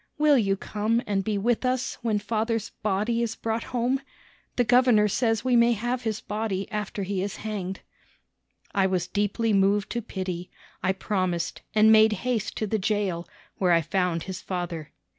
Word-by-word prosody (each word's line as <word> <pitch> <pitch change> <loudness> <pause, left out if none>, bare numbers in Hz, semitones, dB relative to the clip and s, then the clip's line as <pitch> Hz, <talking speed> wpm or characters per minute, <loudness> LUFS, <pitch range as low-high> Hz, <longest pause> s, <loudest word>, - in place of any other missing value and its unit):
Will 300 -1 +5
you 195 -3 +1
come 215 +4 0
and 195 -2 0
be 215 0 -1
with 230 +5 +1
us 255 0 -1
when 225 -3 +1
father's 220 +1 -1
body 215 +3 0
is 225 -1 -1
brought 225 0 -2
home? 250 +2 0 0.5
The 245 - +3
governor 240 -3 +5
says 225 +2 0
we 255 -1 +3
may 235 0 +5
have 240 +3 -2
his 220 -2 -2
body 210 -2 -3
after 210 -1 -3
he 190 0 -2
is 200 +1 -3
hanged." 195 -3 -4 0.9
I 195 -1 +3
was 185 -2 -1
deeply 210 +2 0
moved 200 +1 +2
to 235 - -1
pity. 185 -4 -5 0.3
I 185 - +2
promised, 185 -3 -2
and 215 +1 +6
made 220 0 +6
haste 230 -4 -1
to 215 - 0
the 215 +1 -1
jail, 190 -4 -1 0.3
where 180 -2 +4
I 165 - +4
found 180 -1 0
his 185 -1 -6
father. 175 -4 -4
210 Hz, 175 wpm, -26 LUFS, 190-230 Hz, 0.9 s, and